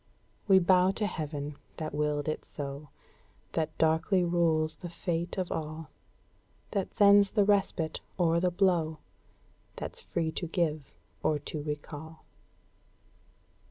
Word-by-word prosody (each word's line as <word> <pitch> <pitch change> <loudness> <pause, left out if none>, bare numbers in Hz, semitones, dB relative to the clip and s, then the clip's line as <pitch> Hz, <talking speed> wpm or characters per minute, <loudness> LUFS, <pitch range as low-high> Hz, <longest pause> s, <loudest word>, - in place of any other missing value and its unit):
We 195 -2 +7
bow 185 0 +5
to 210 - -1
heaven 150 -5 -4 0.2
that 155 -2 -4
willed 150 0 0
it 155 - -2
so, 140 0 -7 0.6
That 160 -1 -2
darkly 160 +4 +3
rules 165 -2 +1
the 175 - -7
fate 170 0 -3
of 185 -2 -2
all, 155 -1 -4 0.8
That 195 -2 -2
sends 200 -1 +7
the 205 -1 +3
respite 195 -5 +1 0.2
or 170 -2 +3
the 180 +1 +2
blow, 175 -4 +2 0.8
That's - - -6
free 165 -2 -2
to 175 +2 -4
give 160 -4 -1 0.3
or 155 - +2
to 150 +1 -6
recall." 150 +1 -7
160 Hz, 125 wpm, -30 LUFS, 155-180 Hz, 0.8 s, We